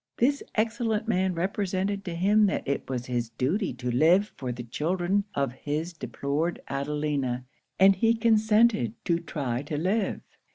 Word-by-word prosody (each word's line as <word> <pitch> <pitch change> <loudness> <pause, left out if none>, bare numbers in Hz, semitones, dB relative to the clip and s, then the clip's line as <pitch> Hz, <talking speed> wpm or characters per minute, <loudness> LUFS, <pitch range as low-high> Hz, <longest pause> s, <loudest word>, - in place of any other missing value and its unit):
This 280 +4 +2
excellent 225 0 0
man 190 -4 +1
represented 195 +2 -1
to 175 -3 -4
him 205 +4 +4
that 195 - -2
it 140 -1 -2
was 125 -2 -3
his 120 -2 -2
duty 155 - -1
to 125 0 -3
live 170 - +4
for 130 -2 -4
the 120 0 -6
children 175 - 0
of 140 -2 0
his 150 +6 -3
deplored 155 +1 -2
Adelina; 140 -3 -2 0.3
and 195 +1 +7
he 225 +4 +3
consented 220 - +3
to 170 -1 +2
try 140 -7 -3
to 150 +1 -4
live. 195 +6 0
175 Hz, 155 wpm, -27 LUFS, 140-205 Hz, 0.3 s, and